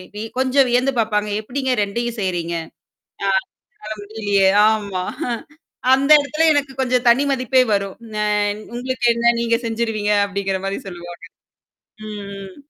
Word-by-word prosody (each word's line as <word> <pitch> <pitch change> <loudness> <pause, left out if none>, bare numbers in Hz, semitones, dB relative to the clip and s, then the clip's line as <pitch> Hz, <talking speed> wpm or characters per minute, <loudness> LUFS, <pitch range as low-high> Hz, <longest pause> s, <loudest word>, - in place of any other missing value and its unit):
We 210 - -4 0.2
கொஞ்சம் 265 0 +3
வியந்து 250 +3 +2
பாப்பாங்க. 210 -1 0
எப்படிங்க 260 +3 -2
ரெண்டையும் 235 +3 -3
செய்றீங்க. 170 -2 -2 0.7
ஆ. - - +2 0.5
என்னால 215 +1 -7
முடியலயே. 205 -2 +1 0.2
ஆமா. 200 -4 -2 0.3
அஹ 235 -1 -1 0.6
அந்த 275 +2 0
எடத்துல 305 +3 0
எனக்கு 280 -2 0
கொஞ்சம் 250 -1 +1
தனி 255 +4 +4
மதிப்பே 255 0 +3
வரும். 200 -1 -2 0.3
அ - - +2 0.5
உங்களுக்கு 255 0 -2
என்ன? 235 0 +3
நீங்க 230 0 +2
செஞ்சுருவீங்க! 225 -2 -1 0.2
அப்படிங்கிற 195 -1 -2
மாரி 195 0 -2
சொல்லுவாங்க. 175 -1 -9 0.9
ம், 210 -1 -6 0.2
ம். 190 -1 -10
220 Hz, 135 wpm, -20 LUFS, 200-255 Hz, 0.9 s, தனி